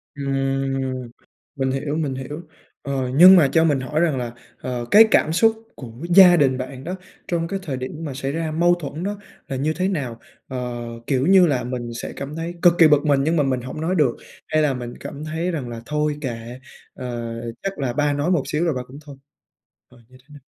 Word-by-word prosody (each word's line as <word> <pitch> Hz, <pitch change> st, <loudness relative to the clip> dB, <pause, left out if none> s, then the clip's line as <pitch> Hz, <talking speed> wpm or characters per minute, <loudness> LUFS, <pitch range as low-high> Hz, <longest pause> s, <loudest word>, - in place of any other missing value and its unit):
Ừm, 135 Hz, -2 st, -2 dB, 0.5 s
mình 135 Hz, -1 st, -1 dB
hiểu, 145 Hz, +2 st, -2 dB
mình 145 Hz, -5 st, -2 dB
hiểu. 145 Hz, +5 st, -6 dB, 0.4 s
Ờ, 135 Hz, -2 st, -2 dB
nhưng 185 Hz, +4 st, +10 dB
mà 160 Hz, -6 st, +6 dB
cho 160 Hz, +2 st, +4 dB
mình 145 Hz, -4 st, +2 dB
hỏi 150 Hz, +4 st, -2 dB
rằng 160 Hz, -6 st, +1 dB
là, 120 Hz, -2 st, -4 dB, 0.3 s
ờ, 125 Hz, -2 st, -4 dB
cái 220 Hz, +2 st, +9 dB
cảm 155 Hz, -, +3 dB
xúc 225 Hz, +4 st, +2 dB
của 120 Hz, -4 st, -9 dB, 0.2 s
gia 180 Hz, -1 st, +8 dB
đình 135 Hz, -5 st, +2 dB
bạn 130 Hz, 0 st, -7 dB
đó 180 Hz, +5 st, -4 dB, 0.3 s
trong 170 Hz, -2 st, -1 dB
cái 195 Hz, +3 st, -3 dB
thời 135 Hz, -6 st, -4 dB
điểm 130 Hz, 0 st, -5 dB
mà 140 Hz, -, -5 dB
xảy 135 Hz, +1 st, -3 dB
ra 160 Hz, 0 st, -3 dB
mâu 175 Hz, +2 st, +3 dB
thuẫn 160 Hz, 0 st, -6 dB
đó 205 Hz, +1 st, -3 dB, 0.3 s
là 135 Hz, -, -4 dB
như 150 Hz, +4 st, 0 dB
thế 185 Hz, +3 st, -1 dB
nào? 130 Hz, -11 st, -3 dB, 0.3 s
Ờ, 125 Hz, -2 st, -5 dB, 0.2 s
kiểu 135 Hz, -1 st, +1 dB
như 190 Hz, -2 st, +6 dB
là, 135 Hz, -5 st, 0 dB
mình 125 Hz, -1 st, -4 dB
sẽ -, -, -6 dB
cảm 140 Hz, +2 st, -6 dB
thấy 165 Hz, +1 st, -4 dB
cực 175 Hz, -1 st, +6 dB
kỳ 165 Hz, -, +9 dB
bực 150 Hz, 0 st, +3 dB
mình 140 Hz, -2 st, +3 dB
nhưng 160 Hz, +3 st, +1 dB
mà 150 Hz, -, +3 dB
mình 130 Hz, -2 st, -1 dB
hổng 130 Hz, +5 st, -7 dB
nói 180 Hz, +4 st, 0 dB
được, 145 Hz, -7 st, +2 dB, 0.3 s
hay 155 Hz, -, +1 dB
là 150 Hz, -3 st, +2 dB
mình 120 Hz, -1 st, -6 dB
cảm 145 Hz, +2 st, -8 dB
thấy 160 Hz, +3 st, -2 dB
rằng 135 Hz, -7 st, -4 dB
là 115 Hz, -1 st, -7 dB
"Thôi 150 Hz, 0 st, -1 dB
kệ, 120 Hz, -1 st, -6 dB, 0.4 s
à, 120 Hz, -2 st, -5 dB, 0.3 s
chắc 195 Hz, -5 st, -4 dB
là 125 Hz, -3 st, -1 dB
ba 145 Hz, 0 st, +1 dB
nói 145 Hz, +6 st, 0 dB
một 155 Hz, -7 st, +2 dB
xíu 160 Hz, +3 st, 0 dB
rồi 165 Hz, -, +1 dB
ba 125 Hz, -, -3 dB
cũng 135 Hz, -, -12 dB
thôi" 140 Hz, -2 st, -11 dB, 0.7 s
à, 125 Hz, -, -19 dB
như 130 Hz, -, -18 dB
thế 135 Hz, -, -38 dB
nào? 145 Hz, -, -13 dB
140 Hz, 230 wpm, -22 LUFS, 130-165 Hz, 0.7 s, nhưng